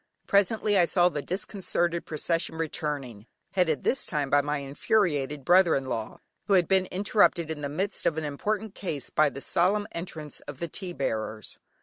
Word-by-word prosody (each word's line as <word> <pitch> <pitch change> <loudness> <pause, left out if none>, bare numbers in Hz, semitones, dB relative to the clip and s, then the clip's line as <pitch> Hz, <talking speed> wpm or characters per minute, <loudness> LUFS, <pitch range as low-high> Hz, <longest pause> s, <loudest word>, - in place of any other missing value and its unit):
Presently 205 0 +3
I 175 - +6
saw 175 0 +4
the 150 -4 -3
disconcerted 175 -1 -1
procession 165 +2 -1
returning, 145 -8 -4 0.2
headed 165 -7 +1
this 270 - +1
time 145 -4 -2
by 145 0 +5
my 145 +1 -1
infuriated 145 -1 0
brother 180 -2 +5
in 135 - -1
law, 115 -4 -4 0.3
who 200 - +2
had 180 -3 +4
been 190 -1 +3
interrupted 185 -4 +2
in 150 -2 -5
the 140 - -3
midst 190 +8 -1
of 160 - 0
an 160 - -1
important 205 +8 -2
case, 155 -8 -5
by 155 -1 +4
the 140 0 -8
solemn 190 +6 +2
entrance 160 -4 -6
of 145 -2 -7
the 170 - -3
tea 180 +2 -6
bearers. 110 -6 -3
165 Hz, 180 wpm, -27 LUFS, 145-185 Hz, 0.3 s, I